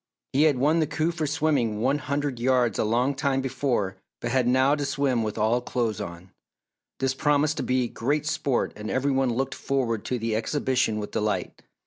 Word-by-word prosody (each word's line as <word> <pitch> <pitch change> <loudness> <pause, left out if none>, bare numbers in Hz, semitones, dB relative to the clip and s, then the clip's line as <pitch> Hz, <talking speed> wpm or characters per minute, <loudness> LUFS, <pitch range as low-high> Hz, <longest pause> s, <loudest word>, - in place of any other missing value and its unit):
He 145 +4 +4
had 140 - 0
won 150 +6 +3
the 155 - +2
coup 160 +2 0
for 160 -3 -2
swimming 140 -8 +1
one 135 +6 +1
hundred 140 -2 -2
yards 125 -3 +2
a - - +3
long 120 +5 +1
time 135 -1 0
before 125 -7 -1 0.2
but 120 - -3
had 125 -1 +2
now 130 +3 +4
to 145 -1 -1
swim 140 -3 0
with 105 -1 -3
all 115 +3 +2
clothes 120 -4 -2
on. 85 +2 -8 0.7
This 135 0 +1
promised 145 +2 +1
to - - -1
be 125 -1 +1
great 145 +6 -1
sport 155 -5 0
and 105 0 -6
every 135 +2 +1
one 135 -1 +2
looked 130 +3 -1
forward 120 -6 -1
to 125 - -1
the 115 -1 -1
exhibition 125 -1 0
with 105 -1 -5
delight. 105 0 -2
130 Hz, 195 wpm, -26 LUFS, 115-145 Hz, 0.7 s, He